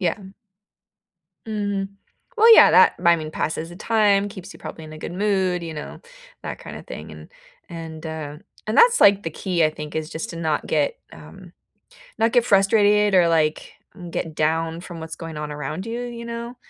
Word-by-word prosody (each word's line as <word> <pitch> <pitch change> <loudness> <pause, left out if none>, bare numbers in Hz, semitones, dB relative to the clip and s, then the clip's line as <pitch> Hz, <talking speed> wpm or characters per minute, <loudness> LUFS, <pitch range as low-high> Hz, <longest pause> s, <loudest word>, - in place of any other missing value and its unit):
Yeah, 175 -4 +1
m 195 -2 -13 1.1
Mhm. 205 -2 -2 0.5
Well, 455 +1 +8
yeah, - - +8
that, - - +6
I 170 0 +6
mean, 155 -1 -6
passes 160 +1 -3
the 175 - -11
time, 205 -2 +2
keeps 195 -3 -10
you - - -15
probably 160 - -9
in 155 - -11
a 155 - -10
good 165 - -6
mood, 190 -3 0
you 165 -1 -6
know, 150 - -8 0.4
that - - -6
kinda - - -9
thing, - - -9
and - - -12 0.4
and, 160 -1 -8
uh, 155 -2 -6 0.3
that's, 470 - +5
like, 200 0 +6
the 165 - -4
key, 175 +1 0
I 155 - +2
think, 150 -1 -9
is 155 0 -3
just 160 - -5
to 170 - -8
not 160 -3 -2
get, - - 0
um - - -13 0.7
not 225 +1 +2
get 245 -2 +4
frustrated 205 0 +3
or, 180 -2 +5
like, 155 -2 0 0.4
get 165 -1 -4
down 160 +2 -1
from 175 -3 -9
what's 160 0 -7
going 165 -2 -8
on 150 0 -5
around 150 +6 -5
you, 235 +2 -4
you 240 -1 -7
know? 235 +1 -6
175 Hz, 190 wpm, -22 LUFS, 160-210 Hz, 1.1 s, Well